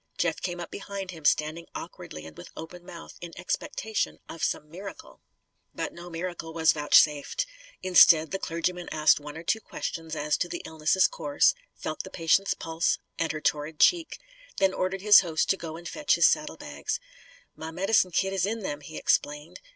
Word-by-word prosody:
Jeff 165 -2 0
came 175 -1 -3
up 175 - -7
behind 195 -2 -6
him, 165 -3 -11
standing 155 +3 +1
awkwardly 80 - -8
and 80 -1 -11
with 85 - -11
open 175 +2 -9
mouth, 175 -2 -10
in 170 -1 -7
expectation 220 - -2
of 165 - -8
some 150 - -1
miracle. 190 +6 -10 0.5
But - - -3
no 175 +1 -10
miracle 170 -1 -5
was 160 -1 +4
vouchsafed. 150 - +3 0.4
Instead 165 -3 +7
the 195 - -2
clergyman 175 +1 -2
asked 155 -1 +4
one 150 +1 -9
or 165 - -8
two 220 +6 0
questions 165 -5 -5
as 150 0 0
to 175 - -2
the 175 - -5
illness' 160 +4 +2
course, 145 -1 +2 0.2
felt 155 - -4
the 190 - -10
patient's 185 +3 +2
pulse 165 +1 0 0.2
and 165 - +1
her 155 - -5
torrid 150 +1 -1
cheek, 340 -2 +4 0.4
then 195 -1 +3
ordered 185 +1 -2
his 205 0 +9
host 160 -3 +1
to - - +2
go 165 -3 -7
and 175 +1 -9
fetch 300 -1 +1
in - - -9
his - - +9
saddlebags. - - -2 0.6
"My 160 - -6
medicine 185 +3 +2
kit 190 +2 0
is 190 0 +1
in 225 +1 -3
them," 150 -6 -4
he 155 +2 -9
explained. 150 +2 0
170 Hz, 185 wpm, -27 LUFS, 155-190 Hz, 0.6 s, his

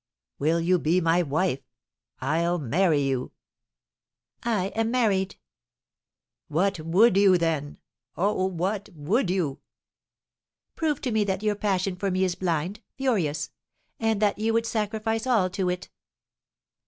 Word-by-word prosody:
"Will 160 +4 +2
you 175 +2 +2
be 165 +4 +2
my 165 0 +3
wife? 155 -1 0 0.6
I'll 170 +2 +1
marry 155 +2 +2
you." 130 -2 -2 1.1
"I 210 -6 0
am 225 +2 -1
married." 205 -6 +1 1.1
"What 185 +4 +1
would 180 +8 +4
you, 195 -2 +6
then? 160 -4 -1 0.4
Oh, 190 0 +1
what 190 +3 -2
would 185 - 0
you?" 170 -7 -1 1.2
"Prove 305 -3 -1
to 250 - -2
me 220 -1 +2
that 190 0 -2
your 210 -1 +2
passion 195 -2 -1
for 195 +2 -2
me 185 0 +1
is 185 -2 +1
blind, 175 +3 -2
furious! 180 - 0 0.5
And 225 -2 +1
that 205 0 +2
you 225 +1 +1
would 230 0 +2
sacrifice 220 +1 -1
all 210 -8 +2
to 185 -1 -1
it." 180 0 -4
185 Hz, 135 wpm, -26 LUFS, 165-215 Hz, 1.2 s, you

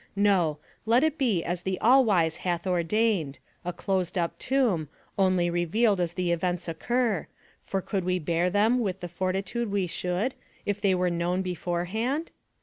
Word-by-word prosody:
No; 190 -7 +3 0.3
let 235 +4 +4
it 315 -1 +2
be 220 -11 +2
as 175 0 -2
the 190 0 -2
All 260 +4 +6
wise 170 -8 +2
hath 175 -1 -2
ordained 180 -3 +1 0.3
a 180 - -2
closed 185 0 -2
up 170 -1 -1
tomb, 230 - +1 0.3
only 185 -3 +3
revealed 180 +4 +2
as 170 -1 -1
the 180 -1 -1
events 175 +1 -1
occur, 220 +3 0 0.3
for 195 -1 -3
could 195 -3 -2
we 180 0 +1
bear 170 +1 0
them 215 +6 +3
with 190 -5 -2
the 175 - -4
fortitude 190 +6 -2
we 200 -2 0
should 180 +8 -1 0.3
if 205 0 -2
they 195 -2 +3
were 180 -1 +1
known 175 +2 0
beforehand 185 - -2
185 Hz, 165 wpm, -27 LUFS, 175-215 Hz, 0.3 s, All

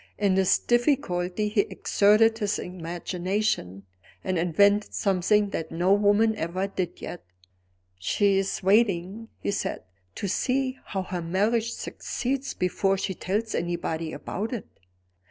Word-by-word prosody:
In 200 -2 +2
this 190 -1 +4
difficulty 210 -6 +1
he 210 0 +3
exerted 215 +3 +3
his 205 -2 0
imagination, 175 - -3 0.4
and 185 -2 0
invented 200 +5 +3
something 200 +1 +2
that 160 - -4
no 175 +4 +2
woman 205 +2 +3
ever 185 +2 -2
did 185 -3 -4
yet. - - -6 0.8
"She's 195 - +1
waiting," 200 +1 +2
he - - -1
said, 200 - -3 0.3
"to 200 - -3
see 255 +6 0
how 190 -2 -3
her 180 -1 -4
marriage 215 +7 +1
succeeds, 270 +2 -3
before 195 +2 +1
she 190 - -2
tells 210 +5 -2
anybody 170 -2 -2
about 220 +8 -4
it." 235 - -4
195 Hz, 125 wpm, -26 LUFS, 180-215 Hz, 0.8 s, this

